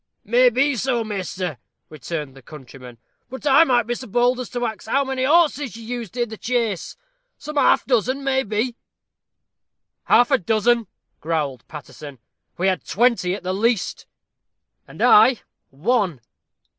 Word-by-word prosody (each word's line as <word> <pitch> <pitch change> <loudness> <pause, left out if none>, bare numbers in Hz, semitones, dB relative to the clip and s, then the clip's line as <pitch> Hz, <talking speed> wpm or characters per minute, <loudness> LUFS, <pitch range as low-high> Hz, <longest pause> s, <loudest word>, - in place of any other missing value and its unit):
"May 245 +4 +4
be 270 +4 +1
so, 240 0 0
measter," 185 - -5 0.3
returned 150 -2 -6
the 135 - -14
countryman; 125 -3 -13 0.3
"but 260 +3 -9
might 295 +3 +5
I 245 -2 +3
be 240 +2 -3
so 255 +2 -8
bold 245 +3 +1
as 250 - -5
to 245 -1 -3
ax 220 -1 -6
how 275 +5 +1
many 265 -1 -2
horses 295 -5 +2
you 230 - -10
used 240 -1 -6
i' 240 - +1
the 220 -1 -10
chase 230 -7 -2 0.4
some 300 +1 -8
half 285 - +3
dozen, 255 +2 0
maybe?" 250 -3 -1 1.3
"Half 245 +3 +4
a 270 - +4
dozen!" 225 +4 +1 0.3
growled 150 -5 -3
Paterson; 145 -2 -10 0.4
"we 180 - -1
had 190 -1 0
twenty 220 -5 +1
at - - -10
the 185 +1 -2
least." 225 +1 -1 0.8
"And - - -6
I 270 - +6 0.3
ONE!" 180 - -1
230 Hz, 150 wpm, -21 LUFS, 180-255 Hz, 1.3 s, I